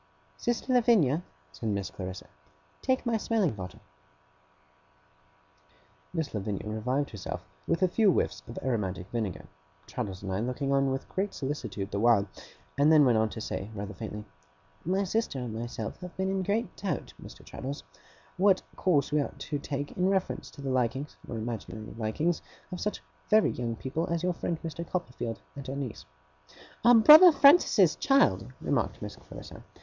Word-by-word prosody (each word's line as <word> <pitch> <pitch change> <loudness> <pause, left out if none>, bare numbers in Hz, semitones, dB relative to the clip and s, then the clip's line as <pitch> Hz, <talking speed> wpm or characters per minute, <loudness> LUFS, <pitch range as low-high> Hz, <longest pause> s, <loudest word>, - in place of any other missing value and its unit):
'Sister 240 +2 -1
Lavinia,' 210 - +4 0.3
said 75 +9 -4
Miss 100 -3 -2
Clarissa, 95 -1 -6 0.6
'take 260 0 +1
my 230 -1 +2
smelling 210 -6 +1
bottle.' 90 -3 -8 2.3
Miss 160 -4 -3
Lavinia 105 -1 -3
revived 125 +7 -1
herself 105 -4 -6 0.2
with 170 - +1
a - - +6
few 200 +2 +4
whiffs - - 0
of 115 - -9
aromatic 100 -8 -1
vinegar 110 -7 -3 0.4
Traddles 100 -6 -5
and 95 - -4
I 95 - 0
looking 125 +4 -2
on 135 0 +3
with 135 0 -3
great 195 +2 -2
solicitude 130 -8 -4
the 100 - -1
while; 110 -3 +4 0.5
and 145 +2 +6
then 150 -2 +7
went 120 -4 +4
on 110 0 +2
to 110 - -7
say, 100 -2 -4
rather 100 0 -5
faintly: 105 +1 -7 0.6
'My 190 +4 +1
sister 220 -5 -1
and 125 -3 -4
myself 115 -1 -5
have 180 -1 -9
been 190 0 0
in 195 0 0
great 210 +5 -1
doubt, 195 - -3
Mr. - - -12
Traddles, 140 +2 -6 0.5
what 190 0 +4
course 160 -7 +2
we 150 0 +3
ought - - -5
to 145 - -4
take 145 0 -4
in 185 +1 +1
reference 190 -1 -1
to 140 - -12
the 135 - -2
likings, 130 +3 -1
or 115 - -4
imaginary 110 -1 -5
likings, 120 +10 -1 0.3
of 180 - -5
such 210 - -3 0.3
very 215 0 +5
young 115 -1 -3
people 140 +8 -3
as 170 0 -1
your 180 0 +1
friend 170 0 -2
Mr. 165 0 -4
Copperfield 125 -10 -4
and 140 -1 -7
our 135 - -3
niece.' 135 - -5 0.8
'Our 240 +1 +8
brother 310 +10 +10
Francis's 280 - +6
child,' 275 0 +3
remarked - - 0
Miss - - -6
Clarissa. - - -11
140 Hz, 165 wpm, -29 LUFS, 110-185 Hz, 2.3 s, brother